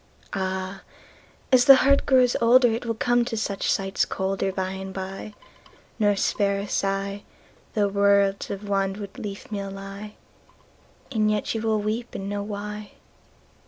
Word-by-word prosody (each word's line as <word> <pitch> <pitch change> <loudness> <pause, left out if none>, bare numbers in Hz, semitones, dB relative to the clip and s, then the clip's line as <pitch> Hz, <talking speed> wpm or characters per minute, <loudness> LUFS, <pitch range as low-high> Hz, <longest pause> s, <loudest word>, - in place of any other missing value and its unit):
Áh! 190 0 -3 0.7
ás 250 -1 +6
the 275 -1 +10
heart 280 +1 +3
grows 255 -2 +4
olderIt 240 0 +4
will 230 -1 -1
come 240 +2 +2
to 235 -1 -4
such 200 -2 -1
sights 195 0 0
colderBy 190 0 -2
and 190 0 -7
by, 195 +2 -6 0.6
nor 205 -1 +3
spare 200 0 +1
a - - -3
sighThough 200 +1 -3
worlds 200 -1 +3
of 200 - -4
wanwood 195 0 -1
leafmeal 200 -2 -5
lie; 195 +2 -8 1.0
And 215 -4 +2
yet 210 -1 0
you 225 - -2
wíll 220 -2 0
weep 225 +3 -3
and 195 - -4
know 205 0 -2
why. 210 0 -6
200 Hz, 135 wpm, -25 LUFS, 195-220 Hz, 1.0 s, the